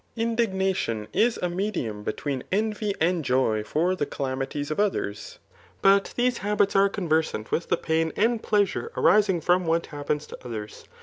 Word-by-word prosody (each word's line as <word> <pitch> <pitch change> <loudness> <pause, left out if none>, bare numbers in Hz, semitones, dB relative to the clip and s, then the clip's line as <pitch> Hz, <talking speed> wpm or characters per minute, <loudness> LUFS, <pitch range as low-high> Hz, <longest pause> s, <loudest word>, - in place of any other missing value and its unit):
IndignaticHi 190 - 0
is 235 +1 +2
a - - +2
medium 175 - -2
between 130 +5 -3
envy 210 0 0
and 170 0 +1
joy 125 -5 +1
for 175 +10 0
the 145 -5 -2
calamities 135 +2 -3
of 155 - -2
others; 190 - -2 0.5
but 195 0 +4
these 245 0 +1
habits 205 0 +1
are 195 0 +5
conversant 160 - -1
with 170 - -1
the - - +2
pain 160 0 0
and 225 +1 +2
pleasure 205 -3 0
arismg 190 -3 +3
from 180 -1 +2
what 165 +1 +1
happens 145 0 -3
to - - -10
others. 110 -4 -7
175 Hz, 160 wpm, -25 LUFS, 145-205 Hz, 0.5 s, are